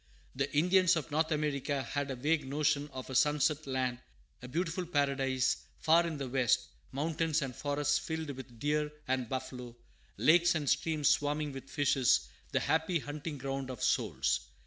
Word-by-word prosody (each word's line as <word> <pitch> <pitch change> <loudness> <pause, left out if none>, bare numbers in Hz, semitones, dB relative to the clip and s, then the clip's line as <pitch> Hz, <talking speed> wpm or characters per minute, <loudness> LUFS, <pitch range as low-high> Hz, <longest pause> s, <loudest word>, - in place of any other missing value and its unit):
The 135 +2 -1
Indians 185 +2 +5
of 160 -2 -3
North 160 +2 +1
America 145 -2 -1
had 145 +3 -3
a 135 - -2
vague 150 +5 +1
notion 145 +1 +1
of 130 0 -7
a - - -5
sunset 150 +2 +2
land, 130 -2 -1 0.4
a 125 - -8
beautiful 170 +5 -2
paradise 135 -4 +1 0.2
far 165 +2 +4
in 160 -3 -4
the 135 -2 -4
west, 125 -2 +1 0.2
mountains 155 +1 0
and 130 -3 -5
forests 145 0 0
filled 160 -2 -4
with 130 -3 -10
deer 150 +3 0 0.2
and 130 -2 -1
buffalo, 125 -2 -5 0.4
lakes 175 +2 +5
and 150 -3 -2
streams 155 +1 +1
swarming 150 0 +1
with 135 -1 -9
fishes, 135 - +2 0.2
the - - +1
happy 160 +2 +1
hunting 145 0 -5
ground 135 0 -4
of 125 -3 -6
souls. - - +1
145 Hz, 165 wpm, -32 LUFS, 130-155 Hz, 0.4 s, Indians